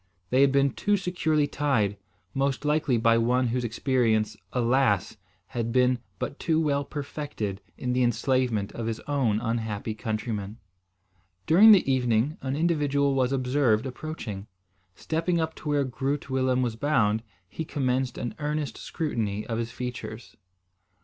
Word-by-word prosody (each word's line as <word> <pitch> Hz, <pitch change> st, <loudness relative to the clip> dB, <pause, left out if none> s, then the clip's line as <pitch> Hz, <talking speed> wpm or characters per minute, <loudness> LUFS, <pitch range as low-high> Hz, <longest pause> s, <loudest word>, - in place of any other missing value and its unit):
They 130 Hz, +2 st, +4 dB
had 140 Hz, -1 st, +5 dB
been 140 Hz, 0 st, +3 dB
too 205 Hz, +9 st, +1 dB
securely 160 Hz, -5 st, +1 dB
tied, 135 Hz, -9 st, 0 dB, 0.4 s
most 135 Hz, -1 st, -1 dB
likely 150 Hz, -4 st, +2 dB
by 115 Hz, 0 st, +4 dB
one 125 Hz, +2 st, +2 dB
whose 125 Hz, +1 st, -1 dB
experience, 115 Hz, -2 st, +1 dB, 0.2 s
alas! 120 Hz, -4 st, +2 dB, 0.3 s
had 115 Hz, -1 st, -2 dB
been 125 Hz, 0 st, +3 dB, 0.2 s
but 140 Hz, -, -5 dB
too 160 Hz, -1 st, +1 dB
well 145 Hz, -3 st, +1 dB
perfected 140 Hz, -9 st, -5 dB, 0.2 s
in 125 Hz, -1 st, -2 dB
the 125 Hz, -, +1 dB
enslavement 120 Hz, -3 st, +1 dB
of 115 Hz, -1 st, -5 dB
his 115 Hz, -1 st, -2 dB
own 130 Hz, -7 st, 0 dB
unhappy 110 Hz, -2 st, -2 dB
countrymen. 110 Hz, -2 st, -4 dB, 0.9 s
During 200 Hz, +7 st, +8 dB
the 195 Hz, -8 st, +6 dB
evening, 125 Hz, +1 st, +1 dB
an 135 Hz, 0 st, -2 dB
individual 145 Hz, -3 st, +1 dB
was 130 Hz, -1 st, +1 dB
observed 130 Hz, -3 st, +2 dB
approaching. 125 Hz, -7 st, -6 dB, 0.5 s
Stepping 165 Hz, +2 st, -1 dB
up 160 Hz, 0 st, -1 dB
to 150 Hz, -, -6 dB
where 145 Hz, -1 st, +2 dB
Groot 135 Hz, +2 st, -3 dB
Willem 130 Hz, -1 st, +2 dB
was 120 Hz, -3 st, -1 dB
bound, 115 Hz, -5 st, +2 dB, 0.3 s
he 160 Hz, -, -5 dB
commenced 130 Hz, -4 st, -1 dB
an 120 Hz, -, -3 dB
earnest 150 Hz, -4 st, -2 dB
scrutiny 110 Hz, -, -2 dB
of 115 Hz, -1 st, -3 dB
his 115 Hz, 0 st, -2 dB
features. 125 Hz, +1 st, -7 dB
130 Hz, 145 wpm, -27 LUFS, 115-145 Hz, 0.9 s, During